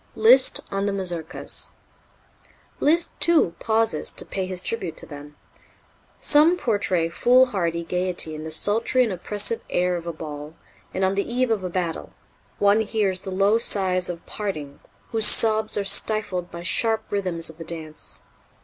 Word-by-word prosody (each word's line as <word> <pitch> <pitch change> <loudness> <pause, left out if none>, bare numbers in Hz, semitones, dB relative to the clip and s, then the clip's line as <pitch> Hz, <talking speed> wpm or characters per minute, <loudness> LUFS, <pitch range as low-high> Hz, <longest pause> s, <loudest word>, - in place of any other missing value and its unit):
Liszt 475 +3 +5
on 195 +1 -2
the - - 0
Mazurkas. 175 -4 +1 1.1
Liszt, 335 +3 +1
too, 320 - +3
pauses 225 0 0
to - - -5
pay 190 -1 -4
his 185 -1 -2
tribute 185 -3 -4
to - - -9
them: 145 -1 -12 0.8
"Some 310 +4 +4
portray 200 - -1
foolhardy 195 -5 +1
gaiety 180 -2 -1
in 155 0 -7
the 160 - -6
sultry 225 +9 +1
and 225 -5 -2
oppressive 210 +5 -1
air 180 0 0
of 170 -1 -7
a - - -2
ball, 150 -1 -9 0.4
and 190 - -1
on 190 - 0
the 200 +4 -3
eve 250 0 0
of 210 -4 -1
a 180 - -4
battle; 175 -2 -4 0.4
one 205 +2 +3
hears 205 -4 -1
the - - -8
low 200 +4 +2
sighs 185 -5 +1
of 170 -1 -7
parting, 155 -9 -6 0.3
whose 220 -2 +7
sobs 220 -1 +5
are 205 - -1
stifled 195 -4 0
by 170 0 -9
sharp 220 +5 0
rhythms 180 -5 0
of 160 - -22
the - - -6
dance. 160 -2 -8
190 Hz, 160 wpm, -22 LUFS, 170-220 Hz, 1.1 s, whose